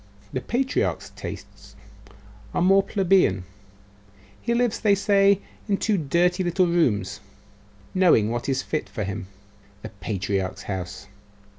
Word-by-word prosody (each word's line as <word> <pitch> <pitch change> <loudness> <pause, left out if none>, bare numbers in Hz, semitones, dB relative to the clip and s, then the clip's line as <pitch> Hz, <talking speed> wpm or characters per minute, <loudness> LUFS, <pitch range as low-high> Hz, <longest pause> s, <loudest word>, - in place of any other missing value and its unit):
'The 130 - -2
patriarch's 265 - -1
tastes - - -9 0.8
are - - +1
more 195 +2 +6
plebeian. 190 - +2 1.0
He 235 0 0
lives, 240 -2 +1
they 205 -2 +4
say, 200 0 +3 0.3
in 200 - +2
two 215 +1 +1
dirty 175 +3 +1
little 180 +1 +2
rooms 125 - +1 0.7
knowing 165 - +4
what 120 +3 -3
is 135 0 0
fit 155 - -3
for 110 - -4
him. 100 0 -5 0.6
The - - -6
patriarch's 95 -1 -3
house? 95 0 -5
175 Hz, 125 wpm, -24 LUFS, -, 1.0 s, more